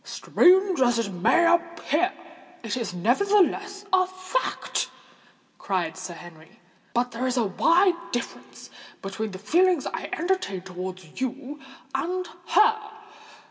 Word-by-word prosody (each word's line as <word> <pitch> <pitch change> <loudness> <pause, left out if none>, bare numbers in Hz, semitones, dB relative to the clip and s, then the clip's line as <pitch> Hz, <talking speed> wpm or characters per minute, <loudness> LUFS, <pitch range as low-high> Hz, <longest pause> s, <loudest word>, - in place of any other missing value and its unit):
"Strange 375 -1 +3
as 240 -2 +3
it 225 -4 -1
may 190 - +3
appear, 340 0 +1 0.5
it 225 -2 -2
is 235 -5 -3
nevertheless 395 - +1
a 370 -1 +4
fact!" 370 +6 -2 0.7
cried 180 -4 -2
Sir 175 - -7
Henry. 165 -2 -14 0.4
"But 245 +1 +1
there 245 +3 -2
is 255 0 -1
a 240 - +3
wide 340 - +2
difference 240 -1 -6 0.3
between 205 +3 -4
the 190 - -8
feelings 340 - +2
I - - -4
entertain 345 - -1
towards 185 +1 -8
you 275 +3 -4 0.3
and 360 +7 -2 0.2
her. 435 +5 +4
280 Hz, 125 wpm, -25 LUFS, -, 0.7 s, a